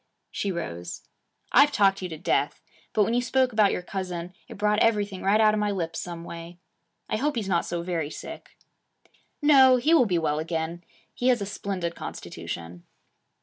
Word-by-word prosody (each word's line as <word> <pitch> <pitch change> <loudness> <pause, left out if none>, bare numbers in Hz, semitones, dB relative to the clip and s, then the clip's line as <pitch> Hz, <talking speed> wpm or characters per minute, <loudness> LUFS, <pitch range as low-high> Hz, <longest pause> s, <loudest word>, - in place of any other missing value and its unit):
She 200 - -2
rose. 90 - -5 0.5
'I've 285 +3 +6
talked 195 -1 +3
you 185 - -4
to 160 - -6
death. - - 0 0.3
But 210 - +3
when 225 - 0
you 245 - +2
spoke 255 0 +1
about 215 -2 +4
your 180 - -3
cousin, 180 -2 -5
it - - -10
brought 210 +1 +2
everything 205 -4 +1
right 200 +3 +3
out 215 -1 +5
of 215 - 0
my 210 0 +1
lips 165 -5 -3
some 170 -1 -6
way. 170 +1 -9 0.5
I - - -1
hope 290 +4 0
he's 220 -4 -2
not 175 -3 +1
so 170 0 -3
very 170 -4 -2
sick.' - - -9 0.9
'No. 265 -3 +7
He 300 +7 +2
will 255 -8 +5
be 180 -3 +1
well 155 -2 0
again. 165 +1 -3 0.3
He 245 - -1
has 250 -2 +4
a 200 - -3
splendid 190 -4 -3
constitution.' 85 - -7
195 Hz, 190 wpm, -26 LUFS, 170-215 Hz, 0.9 s, No